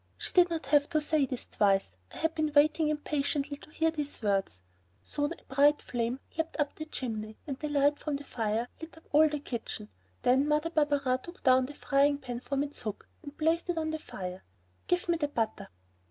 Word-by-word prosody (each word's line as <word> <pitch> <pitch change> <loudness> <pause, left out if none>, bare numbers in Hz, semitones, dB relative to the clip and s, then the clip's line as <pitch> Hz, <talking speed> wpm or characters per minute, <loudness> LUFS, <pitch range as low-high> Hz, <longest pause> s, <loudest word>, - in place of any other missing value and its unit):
She - - -5
did 360 -1 +6
not 330 -1 -3
have 290 0 +3
to 315 -3 +2
say 300 -2 +2
this 255 -1 -4
twice; 195 - +2 0.2
I - - -10
had 325 0 0
been 310 -2 0
waiting 305 +2 +4
impatiently 290 -1 -1
to - - -15
hear 325 +1 +1
these 295 -2 -3
words. 195 - +1 0.4
Soon 290 +1 -2
a 305 - -9
bright 290 +2 +5
flame 240 +1 -2 0.2
leaped 325 0 -3
up 295 -1 +1
the 310 - -6
chimney 220 -7 -4
and 275 -4 -5
the 300 - -3
light 290 0 +3
from 300 -2 -2
the 280 - -5
fire 225 -2 -1
lit 320 0 -9
up 320 - -15
all 310 +1 +6
the 295 - -2
kitchen. 235 - -5 0.3
Then 265 +3 +4
Mother 300 +2 +1
Barberin 285 -5 +2
took 345 +5 -12
down 255 -1 +5
the 290 - -9
frying 285 0 +3
pan 250 -4 -5
from 275 +2 -1
its 290 0 -6
hook 215 -3 -5
and 285 -2 -10
placed 325 +3 +1
it 350 - 0
on 315 -1 0
the 315 - -3
fire. 185 -7 -6 0.5
"Give 355 0 +1
me 340 -1 +2
the 295 -2 0
butter!" 225 -6 -2
290 Hz, 210 wpm, -30 LUFS, 255-310 Hz, 0.5 s, did